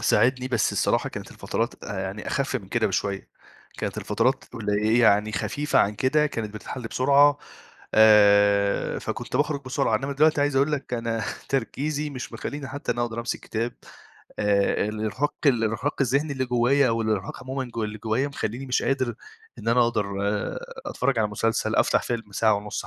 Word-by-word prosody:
ساعدني، 130 0 +2
بس 120 -5 +1
الصراحة - - +1
كانت - - -8
الفترات - - -3
آآ - - -4
يعني - - -5
أخِف - - -1
من - - -9
كده - - +1
بشوية. 100 -1 -2 0.5
كانت - - -3
الفترات - - 0
قلي 105 +1 +1
يعني 105 -2 +4
خفيفة 145 +9 0
عن 105 - +3
كده 150 +7 +2
كانت 110 -6 -5
بتتحل 125 +4 -7
بسرعة، 140 +3 +4 0.6
آآ 100 -2 +5
فكنت - - -4
باخرُج 145 0 0
بسرعة، 120 -3 +1
إنّما 135 +5 -3
دلوقتي 150 +2 +3
عايز 145 -1 +1
أقول 140 +3 +3
لك 140 -4 -2
أنا 115 -1 -2 0.3
تركيزي 145 +3 -2
مش 130 -3 -7
مخلّيني 140 -2 -5
حتّى 145 +2 -3
أنا 120 - -2
أقدر 115 -1 -3
أمسك 120 - -3
كتاب. 115 +2 -3 0.7
آآ 100 0 +2
الإرهاق 110 +6 -2
الإرهاق 120 +1 +1
الذهني 140 +4 +1
اللي 130 -1 -1
جوّايا 125 +2 +3
والإرهاق 110 -1 -2
عمومًا 130 +1 -3
جو 115 -1 -1
اللي 105 +1 -5
جوّايا 110 +6 0
مخلّيني 130 -1 -4
مش 125 - 0
قادر 130 -3 0 0.4
إن - - -4
أنا 120 +2 +4
أقدر 110 -3 0 0.8
أتفرّج 125 -1 0
على 110 -1 +2
مسلسل، 110 +1 -1
أفتح - - +3
فيلم 115 -4 -4
ساعة 110 +2 +3
ونُص 105 +1 -4
120 Hz, 165 wpm, -25 LUFS, 110-140 Hz, 0.8 s, آآ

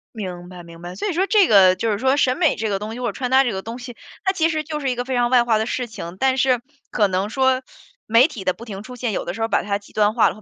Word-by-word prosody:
明 180 -4 -6
白 180 -1 -10
明 170 0 -13
白。 175 +1 -8
所 205 - -3
以 375 - -1
说 375 +4 +1
这 410 -4 +4
个 190 -3 +6
就 225 +3 -1
是 205 - 0
说 265 +3 +2
审 260 -2 +2
美 320 -5 +2
这 220 -1 -2
个 195 -1 -1
东 215 +2 -6
西 240 - -7
或 250 - -2
者 - - -1
穿 250 +5 -3
搭 265 +1 +6
这 245 - -1
个 190 -1 -4
东 230 +4 -7
西， 245 -1 -9 0.3
它 380 - +2
其 330 -4 +1
实 310 -2 -2
就 300 0 -5
是 275 -3 -1
一 250 - -1
个 245 +1 -3
非 260 0 -2
常 240 -1 +2
外 250 -1 +5
化 230 -2 +2
的 220 - -1
事 245 +1 -3
情， 190 -5 -8
但 265 0 +2
是 255 -2 +2 0.3
可 205 - +2
能 190 +2 -1
说， 260 +1 +2 0.4
媒 230 +5 +5
体 240 - -8
的 185 - +1
不 235 - -12
停 200 -3 -7
出 250 +2 -10
现， 245 -2 -2
有 - - -3
的 175 - -4
时 225 - -7
候 225 - +1
把 - - +1
它 200 0 -1
极 205 - -19
端 210 0 +2
化 230 - +4
了， - - -7
或 215 - -15
230 Hz, 365 characters per minute, -21 LUFS, 200-260 Hz, 0.4 s, 个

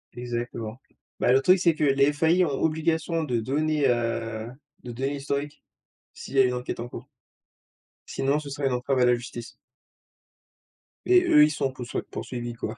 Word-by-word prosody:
Exactement. 120 -2 -5 0.4
Ben, 125 - +3
le 135 - +5
truc, 185 +6 +5
c'est 170 -3 +3
que 155 - -2
les 140 +1 +4
FAI 160 +5 +3
ont 140 -3 -3
obligation 160 +1 0
de 120 -6 -1
donner, 150 +4 0
heu, 115 -2 -1 0.4
de 125 - -7
donner 135 +4 -2
l'historique 140 +1 -4 0.5
s'il - - -9
y - - +4
a 130 - +8
une 125 - 0
enquête 125 -1 -4
en 120 - -4
cours - - -9 1.0
sinon, 140 +2 0
ce 145 -2 -8
serait 140 0 -2
une 130 - 0
entrave 130 +2 0
à 125 - +5
la 125 0 +4
justice 120 -1 -8 1.5
et 365 -1 +5
eux, 150 - +6
ils 150 - +5
sont 135 -3 -1
poussoi 125 -2 -5
poursuivis, 120 -1 -5
quoi. 115 0 -6
135 Hz, 180 wpm, -26 LUFS, 120-150 Hz, 1.5 s, a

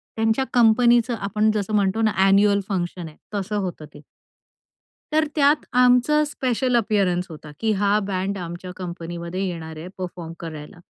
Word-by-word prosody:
त्यांच्या 225 +4 +1
कंपनीचं 240 0 +4
आपण 210 +1 0
जसं 215 0 -2
म्हणतो 200 +1 +1
ना 220 -1 +3 0.2
एन्युअल 200 +1 +4
फंक्शन 175 -3 -3
आहे, 150 - -14 0.2
तसं 205 +1 -3
होतं 180 -6 -4
ते. - - -13 1.1
तर 310 0 +3
त्यात 290 0 +3
आमचं 250 +4 +4
स्पेशल 255 -3 -1
अपिअरन्स 195 -5 +1
होता, 155 -2 -10
की 220 -1 +1
हा 205 +1 +3
बँड 195 +1 -2
आमच्या 175 0 -7
कंपनीमध्ये 170 0 -6
येणार 160 -3 -6
आहे 160 +3 -8
परफॉर्म 175 -3 -6
करायला. 155 -1 -8
200 Hz, 150 wpm, -23 LUFS, 175-225 Hz, 1.1 s, कंपनीचं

